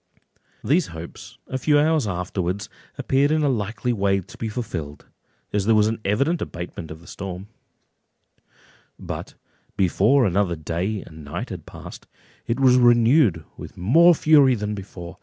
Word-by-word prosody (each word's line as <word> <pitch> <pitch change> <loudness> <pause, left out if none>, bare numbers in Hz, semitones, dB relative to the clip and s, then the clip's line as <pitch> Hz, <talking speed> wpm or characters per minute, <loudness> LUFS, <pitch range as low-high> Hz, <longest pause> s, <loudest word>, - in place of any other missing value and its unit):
These 155 +8 +2
hopes 85 0 -10
a 130 - -4
few 150 +2 +3
hours 150 -4 +2
afterwards 90 +1 -3 0.3
appeared 140 +2 +2
in 155 0 +1
a 145 - +2
likely 115 +1 -2
way 100 -2 +1
to - - -15
be 110 - -4
fulfilled, 85 - -6 0.5
as 100 -2 0
there 115 - +5
was 105 -1 +4
an 110 +1 -1
evident 140 - 0
abatement 85 -2 -6
of 80 +1 -10
the - - -17
storm; 95 +1 -7 1.5
but - - -7 0.4
before 105 +8 +3
another 95 -1 +1
day 90 +6 -3
and 80 -1 -13
night 70 +1 -6
had - - -8
passed, - - -11 0.4
it 115 +2 -1
was 130 -2 +5
renewed 120 - +4
with - - -10
more 165 - +5
fury 145 -5 +5
than 105 -1 -3
before. 95 -3 -9
105 Hz, 155 wpm, -23 LUFS, 90-130 Hz, 1.5 s, there